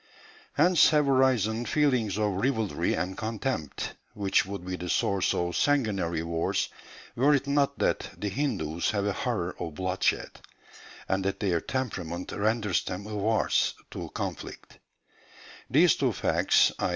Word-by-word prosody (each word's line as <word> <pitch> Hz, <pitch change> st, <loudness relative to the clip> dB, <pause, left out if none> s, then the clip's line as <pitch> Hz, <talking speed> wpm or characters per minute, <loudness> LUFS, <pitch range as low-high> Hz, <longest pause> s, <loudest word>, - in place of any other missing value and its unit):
Hence 175 Hz, +4 st, +5 dB
have 150 Hz, -2 st, +3 dB
arisen 125 Hz, -4 st, +2 dB
feelings 125 Hz, -8 st, +1 dB
of 105 Hz, -1 st, +1 dB
rivalry 110 Hz, -, 0 dB
and 90 Hz, +3 st, -2 dB
contempt, 110 Hz, -, -3 dB, 0.2 s
which 100 Hz, -2 st, +1 dB
would 100 Hz, -2 st, -6 dB
be 90 Hz, 0 st, -3 dB
the 90 Hz, -1 st, -6 dB
source 100 Hz, +1 st, +1 dB
of 85 Hz, 0 st, -1 dB
sanguinary 100 Hz, -, +1 dB
wars, 85 Hz, 0 st, -1 dB, 0.5 s
were 145 Hz, +4 st, +4 dB
it 140 Hz, -, -1 dB
not 140 Hz, 0 st, +1 dB
that -, -, 0 dB
the 105 Hz, -, -2 dB
Hindus 95 Hz, -, -1 dB
have 100 Hz, -2 st, 0 dB
a 100 Hz, -, 0 dB
horror 105 Hz, -7 st, -2 dB
of 80 Hz, -3 st, -5 dB
bloodshed, 95 Hz, +1 st, -1 dB, 0.7 s
and 95 Hz, 0 st, 0 dB
that 100 Hz, -, -1 dB
their 90 Hz, -5 st, +1 dB
temperament 90 Hz, -10 st, -4 dB
renders 105 Hz, -3 st, 0 dB
them 95 Hz, +2 st, -5 dB
averse 105 Hz, +1 st, +1 dB, 0.2 s
to -, -, -6 dB
conflict. -, -, -6 dB, 0.9 s
These -, -, +5 dB
two -, -, +1 dB
facts, -, -, +3 dB
i. -, -, 0 dB
105 Hz, 140 wpm, -28 LUFS, 90-130 Hz, 0.9 s, Hence